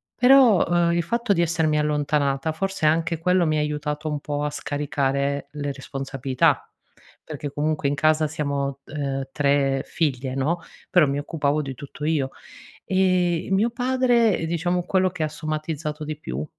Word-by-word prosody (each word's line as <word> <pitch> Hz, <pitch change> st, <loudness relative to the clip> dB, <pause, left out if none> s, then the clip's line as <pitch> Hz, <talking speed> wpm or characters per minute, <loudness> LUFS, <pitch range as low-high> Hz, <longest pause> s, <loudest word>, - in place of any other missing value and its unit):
Però, 220 Hz, -10 st, +5 dB
eh, -, -, +1 dB
il 170 Hz, -, +1 dB
fatto 235 Hz, +4 st, -1 dB
di 170 Hz, -, +1 dB
essermi 160 Hz, -2 st, +1 dB
allontanata, 150 Hz, -1 st, 0 dB
forse 195 Hz, +1 st, -2 dB
anche 165 Hz, +1 st, +1 dB
quello 180 Hz, +1 st, +2 dB
mi 155 Hz, -1 st, +1 dB
ha -, -, +2 dB
aiutato 150 Hz, +1 st, -3 dB
un 150 Hz, -1 st, -2 dB
po' 145 Hz, 0 st, -3 dB
a 150 Hz, -, 0 dB
scaricare 140 Hz, -1 st, -1 dB
le 145 Hz, -1 st, -3 dB
responsabilità, 135 Hz, -1 st, -1 dB, 0.5 s
perché 150 Hz, -2 st, -6 dB
comunque 150 Hz, 0 st, -1 dB
in 140 Hz, -, 0 dB
casa 155 Hz, +1 st, +3 dB
siamo, 140 Hz, -2 st, -2 dB
uhm, 140 Hz, -2 st, -3 dB
3 140 Hz, -1 st, +1 dB
figlie 130 Hz, -5 st, -2 dB
no, 150 Hz, +6 st, 0 dB, 0.3 s
però 175 Hz, -5 st, +5 dB
mi 140 Hz, +1 st, -1 dB
occupavo 145 Hz, 0 st, -1 dB
di 135 Hz, -2 st, -5 dB
tutto 140 Hz, +2 st, -10 dB
io. 150 Hz, -4 st, 0 dB, 0.5 s
Ehm, 185 Hz, -3 st, +1 dB
e -, -, -7 dB
mio 200 Hz, +5 st, +3 dB
padre, 240 Hz, -5 st, +2 dB
diciamo 175 Hz, +2 st, -1 dB
quello 185 Hz, +1 st, +1 dB
che 165 Hz, -, -3 dB
ha 155 Hz, -, -1 dB
somatizzato 155 Hz, 0 st, -4 dB
di 150 Hz, 0 st, -5 dB
più 70 Hz, -, -4 dB
150 Hz, 165 wpm, -24 LUFS, 140-170 Hz, 0.5 s, Però